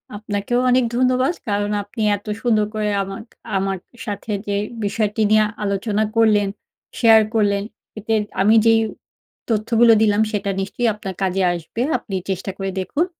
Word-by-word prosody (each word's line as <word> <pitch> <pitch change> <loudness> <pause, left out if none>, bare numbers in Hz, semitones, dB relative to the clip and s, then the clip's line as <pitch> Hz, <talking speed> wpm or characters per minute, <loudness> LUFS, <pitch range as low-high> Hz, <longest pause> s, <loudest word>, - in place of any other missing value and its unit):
আপনাকেও 205 +3 -2
অনেক 255 +1 +4
ধন্যবাদ। 255 +4 +2 0.2
কারণ 205 0 0
আপনি 205 +3 -7 0.2
এত 205 - -20 0.2
সুন্দর 220 -3 +2
করে 210 -1 0
আমা 195 0 -7 0.4
আমার 195 0 -1 0.3
সাথে 205 0 -5 0.2
যে 200 - -1 0.3
বিষয়টি 210 +1 -1
নিয়ে 215 0 +5 0.2
আলোচনা 205 +1 0
করলেন, 215 -3 +4 0.5
শেয়ার 225 -2 +7
করলেন 200 -2 +1 0.4
এতে 225 +2 -2 0.3
আমি 215 +3 +5
যেই 225 0 +5 0.7
তথ্যগুলো 230 +1 +4
দিলাম 210 -1 +3
সেটা 200 -2 -1
নিশ্চয়ই 220 +5 -2
আপনার 200 -2 -6
কাজে 190 0 0
আসবে। 175 +7 -5 0.2
আপনি 195 - -7
চেষ্টা 190 +1 -3
করে 195 -1 -3
দেখুন। 280 - 0
210 Hz, 145 wpm, -20 LUFS, 200-225 Hz, 0.7 s, শেয়ার